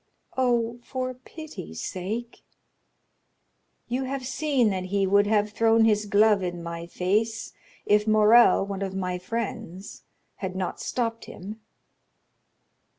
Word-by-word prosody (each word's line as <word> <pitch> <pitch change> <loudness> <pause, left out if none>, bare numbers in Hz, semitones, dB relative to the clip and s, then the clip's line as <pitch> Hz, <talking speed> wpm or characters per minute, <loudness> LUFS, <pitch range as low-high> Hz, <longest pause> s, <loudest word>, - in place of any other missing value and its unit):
"Oh, 240 -2 +1
for 255 +1 -4
pity's 255 - -9
sake!" 215 - -5 1.5
"You 255 +2 -2
have 265 0 -4
seen 265 -4 +1
that 185 -1 -3
he 195 +1 +1
would 200 +2 +4
have 210 -1 +2
thrown 225 +1 +4
his 210 -1 +2
glove 205 0 +4
in 175 -2 -4
my 170 0 -6
face 215 +6 -1 0.3
if 210 +1 +3
Morrel, 215 0 +6
one 200 -1 -5
of 190 -1 -3
my 180 -1 -2
friends, 195 -2 -5 0.4
had 190 -2 -5
not 185 -1 -3
stopped 230 -2 -2
him." 210 +4 -9
210 Hz, 125 wpm, -26 LUFS, 190-235 Hz, 1.5 s, Morrel